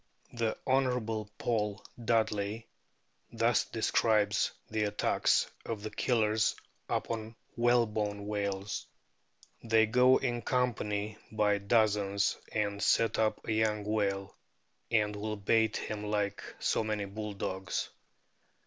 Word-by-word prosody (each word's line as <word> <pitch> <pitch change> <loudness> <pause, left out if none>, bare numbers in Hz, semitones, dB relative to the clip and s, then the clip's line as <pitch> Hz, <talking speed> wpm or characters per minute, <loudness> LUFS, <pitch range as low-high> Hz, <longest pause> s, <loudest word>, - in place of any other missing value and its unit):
The 115 -2 -1
Hon. 125 -5 0
Paul 105 -3 -1 0.2
Dudley* 110 -1 0 0.7
thus - - +2
describes 105 -2 +2 0.2
the 110 -1 +1
attacks 105 - +2 0.2
of 110 -3 -5
the 110 - -4
Killers 110 -2 +2 0.3
upon 115 0 -2 0.2
whalebone 110 -4 +1
whales: 100 -1 -3 0.4
" - - -30
They 110 0 +6
go 125 +3 +5
in 120 -2 -1
company 110 -5 -1
by 105 -2 +2
dozens 100 -1 +2 0.2
and 100 -1 -1
set 115 -1 +3
upon 110 -1 0
a - - 0
young 110 -1 +1
whale, 100 -2 -1 0.5
and 105 -2 +2
will 105 +1 -3
bait 110 +2 +2
him 105 -1 -4
like 105 -1 -1 0.2
so - - +1
many 105 -2 -2
bulldogs. 100 -2 -4
105 Hz, 115 wpm, -31 LUFS, 105-115 Hz, 0.7 s, They